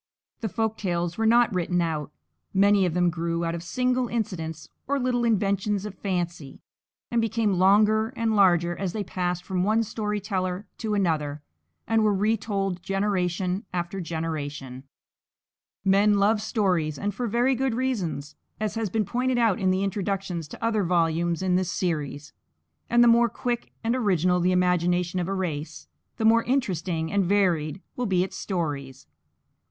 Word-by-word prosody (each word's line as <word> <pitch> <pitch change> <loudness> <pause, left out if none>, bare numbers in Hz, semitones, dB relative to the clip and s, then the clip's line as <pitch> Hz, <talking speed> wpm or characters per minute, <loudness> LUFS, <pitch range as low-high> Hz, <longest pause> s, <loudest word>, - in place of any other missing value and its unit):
The 220 - -3
folk 220 +2 -2
tales 175 -1 -2
were 225 - +2
not 235 -1 +4
written 180 0 0
out; 160 -4 -2 0.4
many 200 -1 +4
of 170 - -3
them 175 -1 +3
grew 170 0 -2
out 165 - -1
of 170 - -4
single 250 +8 0
incidents 165 -9 -4 0.2
or 280 +1 +1
little 245 -1 0
inventions 205 -2 +1
of 210 - -5
fancy, 175 -7 -4 0.5
and 235 -1 +2
became 225 -2 +1
longer 210 +3 +4
and 225 -1 0
larger 175 -3 +4
as 190 -2 -3
they 215 - -2
passed 180 -2 -2
from 185 -1 -1
one 220 +3 +2
story 210 -1 -3
teller 185 -1 -2
to 215 -2 -1
another 150 -6 -1 0.4
and 225 -1 +3
were 210 -1 +3
retold 200 -3 -1
generation 190 -1 -1
after 175 +2 -3
generation. 145 -6 -5 1.0
Men 200 +2 +4
love 210 +2 +3
stories, 180 - 0
and 205 0 -2
for 240 +5 -3
very 240 +4 +2
good 260 -1 0
reasons, 190 - -2 0.2
as 215 -1 -1
has 225 -2 -2
been 215 +2 0
pointed 250 +4 0
out 225 -5 +2
in 185 -1 +2
introductions 195 -3 -2
to - - -10
other 220 -3 +1
volumes 170 0 +1
in 180 -1 +2
this 185 -1 -1
series; 150 -5 -3 0.6
and 240 0 +5
the - - +6
more 235 0 +5
quick 240 +1 -3
and 230 +2 +1
original 185 -7 +2
the 180 +1 +2
imagination 180 0 +1
of 175 - -2
a 195 - -2
race, 160 -5 -4 0.3
the 220 - -1
more 230 +1 +6
interesting 180 - -1
and 200 -1 +2
varied 180 -3 +1
will 245 -1 -2
be 180 -2 +2
its 190 - -6
stories. 140 -8 -4
190 Hz, 165 wpm, -26 LUFS, 175-220 Hz, 1.0 s, the